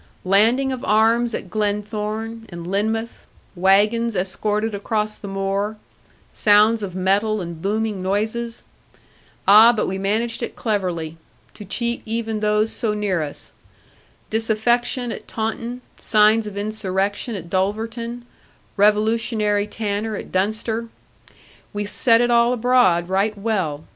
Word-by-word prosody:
Landing 230 +8 +3
of 255 -2 -5
arms 225 +2 +2
at 180 - -7
Glenthorne, 215 +2 -3
and 170 -1 -8
Lynmouth, 220 +5 -2 0.3
wagons 210 +5 +3
escorted 210 +4 -1
across 210 +1 -1
the 205 - -10
moor, 195 +2 -2 0.6
sounds 215 +2 +4
of 190 -3 -5
metal 200 +3 +1
and 170 -3 -7
booming 210 0 -1
noises! 220 +5 -2 0.8
Ah, 215 +4 +9
but 230 - -1
we 190 +1 -3
managed 220 +5 -1
it 235 - -4
cleverly, 180 -7 -2 0.4
to 210 - -10
cheat 235 +4 -2
even 225 -1 -3
those 210 +1 +1
so 215 -2 -1
near 205 -4 0
to 155 - -1
us. 145 - -8 0.8
Disaffection 235 +3 +1
at - - -8
Taunton, 230 +2 -4 0.2
signs 215 0 +3
of 200 -1 -7
insurrection 205 +1 -2
at 175 -4 -7
Dulverton, 225 +6 -2 0.5
revolutionary 210 0 +2
tanner 215 0 -3
at - - -8
Dunster! 220 +4 -1 0.9
We 205 0 -3
set 230 +3 +3
it 240 0 +2
all 235 +1 +4
abroad, 225 -8 +3
right 200 +3 0
well. 190 -9 -2
215 Hz, 130 wpm, -21 LUFS, 200-225 Hz, 0.9 s, Ah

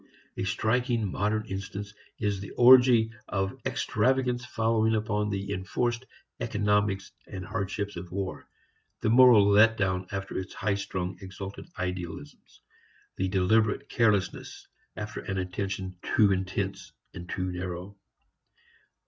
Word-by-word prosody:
A - - -3
striking 115 +1 0
modern 110 +3 0
instance 100 0 -6 0.2
is 105 -2 -1
the 100 - -7
orgy 125 -2 +7 0.2
of 95 -1 -2
extravagance 125 -2 +1
following 110 -1 +1
upon 105 -1 -1
the 100 0 -3
enforced 120 +7 -2 0.3
economies 105 -3 0 0.2
and 95 -1 -7
hardships 100 0 -3
of 85 0 -8
war, 95 0 -5 0.5
the 110 - +2
moral 120 -4 +7
let 110 +3 +5
down 95 -2 0
after 95 -1 -4
its 95 - -7
highstrung 95 -3 -2
exalted 95 - -8
idealisms, 90 -5 -6 0.6
the 95 - 0
deliberate 100 +3 +2
carelessness 105 -5 0 0.3
after 105 0 -5
an 95 - -4
attention 95 0 -3
too 105 -2 +3
intense 95 +1 -3 0.2
and 85 +1 -9
too 90 -2 -2
narrow. 90 +2 -5
100 Hz, 120 wpm, -28 LUFS, 95-110 Hz, 0.6 s, orgy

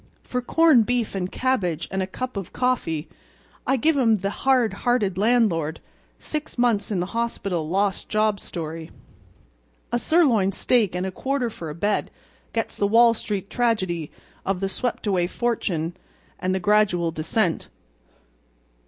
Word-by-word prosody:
For 250 - -2
corned 275 -3 +4
beef 245 -2 0
and 185 -2 -3
cabbage 185 - 0
and 190 0 -1
a 185 - -1
cup 255 +6 -5
of 195 -3 -5
coffee 175 -12 -1 0.6
I 265 - +3
give 315 +5 +2
'em 225 -4 +4
the 195 0 -2
hard 255 -1 +2
hearted 220 -6 +1
landlord—six 215 - -1
months 235 -4 +2
in 200 -4 -1
the 175 - 0
hospital 195 -8 -2
lost 195 +2 0
job 215 -1 +1
story. 165 -1 -6 1.0
A 240 - +1
sirloin 240 - +3
steak 215 -6 +2
and 180 +1 -1
a 190 - -3
quarter 260 +3 -1
for 165 -6 -7
a 150 - -6
bed 205 +5 0 0.4
gets 225 -1 -2
the 200 - +1
Wall 230 +2 +6
Street 205 -3 -4
tragedy 185 -10 0 0.3
of 195 -1 -1
the 195 0 -1
swept 240 +4 -3
away 185 -4 +1
fortune 180 -7 -1 0.4
and 185 +1 0
the - - 0
gradual 185 -4 +2
descent. 165 +3 0
205 Hz, 150 wpm, -24 LUFS, 180-240 Hz, 1.0 s, Wall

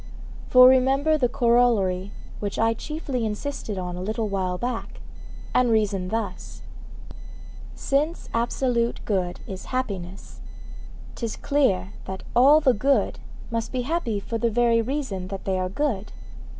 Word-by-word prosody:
For 255 0 +8
remember 270 +4 +4
the 255 -5 +1
corollary 230 -6 +2 0.3
which 200 -1 -4
I 225 +1 +3
chiefly 280 -1 -4
insisted 220 0 -4
on 180 -1 -4
a 180 - -5
little 215 +3 -2
while 185 -2 -1
back, 240 +3 -4 0.5
and 250 -1 +3
reason 205 -4 +1
thus: 205 -3 -5 1.1
Since 300 +5 -1
absolute 235 0 0
good 185 -4 -1
is 190 -1 -7
happiness, 195 -8 -5 0.7
'tis 230 -2 -4
clear 205 -10 +1
that 190 0 -6
all 275 +5 +7
the 265 -4 +4
good 270 +6 +1 0.3
must 230 -1 -2
be 255 -1 -2
happy 245 -8 -1
for 230 +3 -4
the 235 - +2
very 230 0 +3
reason 230 -7 -3
that 195 0 -7
they 190 -1 0
are 185 0 -1
good. 215 -3 -2
230 Hz, 135 wpm, -24 LUFS, 195-255 Hz, 1.1 s, For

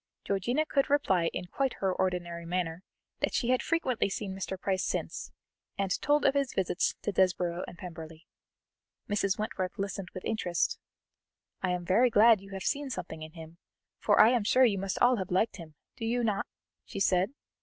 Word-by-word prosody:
Georgiana 240 +10 0
could 275 -2 +1
reply 190 -13 +2
in - - -4
quite 265 +8 -1
her 190 -1 0
ordinary 175 -2 -2
manner 170 -1 -2 0.4
that - - 0
she 240 - 0
had 255 0 +3
frequently 265 -10 0
seen 195 0 -4
Mr. 190 0 -4
Price 190 -1 0
since, - - -3 0.5
and 195 -2 -1
told 295 +1 +2
of 270 - +5
his 280 -2 0
visits 185 -1 +1
to 205 - 0
Desborough 180 -2 +1
and 175 - -10
Pemberley. 165 -2 -9 0.8
Mrs. 205 -1 +1
Wentworth 200 -3 -3
listened 195 -2 -4
with 185 - -6
interest. 175 -6 0 0.8
"I 185 - 0
am 180 -1 -2
very 225 +8 +4
glad 225 -2 +6
you 195 - -13
have 190 -1 -5
seen 285 -1 -1
something 160 -10 -6
in 155 0 -8
him, 165 0 -11 0.4
for - - +3
I 215 - +9
am 245 -4 +2
sure 255 +5 +5
you 200 -5 +2
must 195 0 -2
all 245 0 +4
have 190 -2 -4
liked 195 +5 +1
him, 160 -4 -11 0.2
do 225 - -4
you 240 +1 0
not?" 205 -3 0 0.4
she - - -7
said. 195 +5 +2
195 Hz, 185 wpm, -30 LUFS, 180-230 Hz, 0.8 s, I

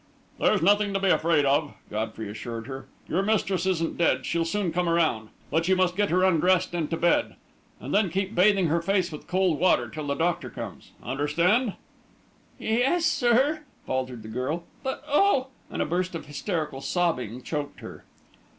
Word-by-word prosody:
"There's - - +3
nothing 205 +1 +3
to - - +2
be 195 0 +1
afraid 160 -2 +3
of," 145 +2 +1 0.2
Godfrey 110 0 -3
assured 115 +2 -6
her. 135 0 -7 0.2
"Your 180 - +1
mistress 195 -3 0
isn't 165 -3 -1
dead 170 - +2
she'll 170 0 0
soon 185 +1 -1
come 175 +1 0
around. 155 -10 +1 0.2
But 165 +2 +1
you 190 - +4
must 185 -1 +1
get 205 +1 +1
her 185 +2 +2
undressed 185 0 +3
and 165 -3 -1
to 165 - -1
bed. 175 - +2 0.4
And - - -6
then 205 -2 +3
keep 190 +4 -2
bathing 195 0 +4
her 165 +1 +1
face 185 0 +1
with 150 - -9
cold 185 -4 +1
water 120 -10 +3
till 155 +2 -6
the 140 - 0
doctor 170 +2 -1
comes. - - -9
Understand?" 170 - +1 0.8
"Ye 220 +2 0
yes, 325 +7 +2
sir," 275 +1 +2 0.2
faltered 130 -3 -3
the - - -9
girl. 130 +9 -3 0.2
"But 265 +1 -4
oh!" 290 -3 +3 0.2
and - - -1
a - - -3
burst 180 +2 -1
of 165 - -6
hysterical 150 -2 -3
sobbing 130 - -1
choked 150 -2 -4
her. - - -10
170 Hz, 180 wpm, -26 LUFS, 145-195 Hz, 0.8 s, you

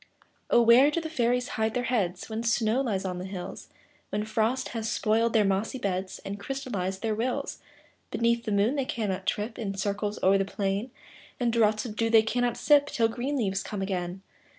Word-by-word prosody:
Oh! 240 - +5
where 240 +5 +7
do 300 - -1
fairies 250 -7 0
hide 220 0 -1
their 250 - 0
heads, 195 -8 -1
When 220 0 -3
snow 230 +1 +2
lies 205 -8 -1
on 180 -1 -3
the 180 - -5
hills, 190 -2 -7 0.4
When 210 +1 -2
frost 220 +4 0
has 225 -2 -3
spoiled 225 +2 +1
their 215 -3 +4
mossy 195 +6 0
beds, 190 -4 -2
And 200 +1 -5
crystallized 200 -6 -4
their 220 -1 +1
rills? 240 +4 -2 0.5
Beneath 235 0 +1
the 215 - -2
moon 210 +7 +2
they 270 - 0
cannot 200 -6 -3
trip 215 +3 -2
In 200 -4 -3
circles 205 +1 -2
o'er 195 +1 +5
the - - +2
plain; 200 +4 -2 0.5
And 240 -2 +1
draughts 215 -1 +2
of 215 -3 -6
dew 225 +1 +1
they 225 -1 +6
cannot 245 +1 0
sip, 290 -1 +4
Till 230 -4 +1
green 250 +5 -3
leaves 195 -5 0
come 200 0 -4
again. 185 -1 -3
220 Hz, 195 wpm, -28 LUFS, 195-240 Hz, 0.5 s, where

